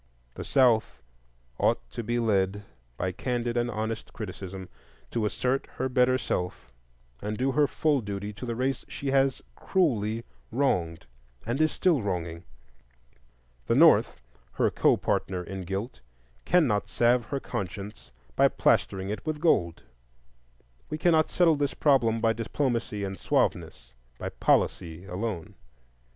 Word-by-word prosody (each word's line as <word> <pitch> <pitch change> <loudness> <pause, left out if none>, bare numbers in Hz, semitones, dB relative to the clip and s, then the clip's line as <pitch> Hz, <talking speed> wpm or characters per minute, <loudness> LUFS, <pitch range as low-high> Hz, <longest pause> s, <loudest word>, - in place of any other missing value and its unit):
The - - -6
South 110 - +2 0.6
ought - - +3
to - - -4
be 120 +2 -1
led, 105 -3 +1 0.3
by 95 - -1
candid 120 +4 -2
and 120 0 +1
honest 110 0 -4
criticism, 95 -3 -7 0.4
to 110 -3 0
assert 130 +5 -1
her 130 - -1
better 130 0 +3
self 90 - -3 0.5
and 105 +1 -3
do 135 +2 +1
her 145 +2 +3
full 150 -3 +1
duty 100 0 -5
to 125 +5 -7
the 115 - -2
race 130 +3 -1
she 140 -1 -4
has 135 -1 +2
cruelly 115 - 0 0.3
wronged 90 -11 0 0.4
and 120 +6 -1
is 155 - +3
still 170 -8 +2
wronging. 85 -4 -3 1.2
The - - +2
North—her - - +3
co - - +3
partner 90 -1 -1
in 95 0 -6
guilt—cannot 95 - -1
salve 120 0 +2
her 140 +5 -3
conscience 100 - -6 0.3
by - - +5
plastering 95 +1 +1
it 105 -2 -5
with 155 -1 -3
gold. 90 - +2 1.1
We 155 - -3
cannot 160 -1 +3
settle 165 -4 +3
this 145 -1 -1
problem 120 -6 +3
by 115 0 +3
diplomacy 115 -2 -2
and 95 -1 -4
suaveness, - - -1 0.2
by - - -4
"policy" 85 +2 0
alone. 95 -2 -4
110 Hz, 135 wpm, -27 LUFS, 95-130 Hz, 1.2 s, by